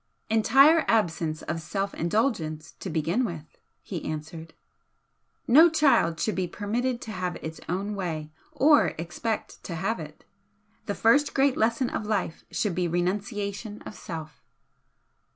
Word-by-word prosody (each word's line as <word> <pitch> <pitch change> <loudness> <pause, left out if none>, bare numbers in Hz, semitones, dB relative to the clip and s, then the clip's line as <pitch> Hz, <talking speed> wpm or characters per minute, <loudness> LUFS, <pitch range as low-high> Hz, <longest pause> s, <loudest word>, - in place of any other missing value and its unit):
"Entire 275 +9 +6
absence 165 -7 +1
of 165 +1 -3
self 195 +5 -3
indulgence, 165 - -1
to 190 - -5
begin 165 +9 0
with," 165 -9 -6 0.2
he - - -5
answered 160 +1 -6 0.9
"No 315 +8 +8
child 275 - +3
should 215 - 0
be 185 0 -1
permitted 235 +7 -2
to 220 - -7
have 180 -3 -3
its 160 0 -6
own 195 +4 -2
way 160 -6 -4 0.2
or 295 +2 +4
expect 175 +7 -4
to 170 - -5
have 195 +6 -1
it. 155 -1 -10 0.6
The 205 - -1
first 280 +6 +3
great 270 -1 +3
lesson 230 +3 +1
of 210 - -3
life 200 -6 -2
should 210 -4 -1
be 180 0 0
renunciation 200 +4 -2
of - - -8
self." 160 -5 -8
195 Hz, 140 wpm, -27 LUFS, 165-230 Hz, 0.9 s, No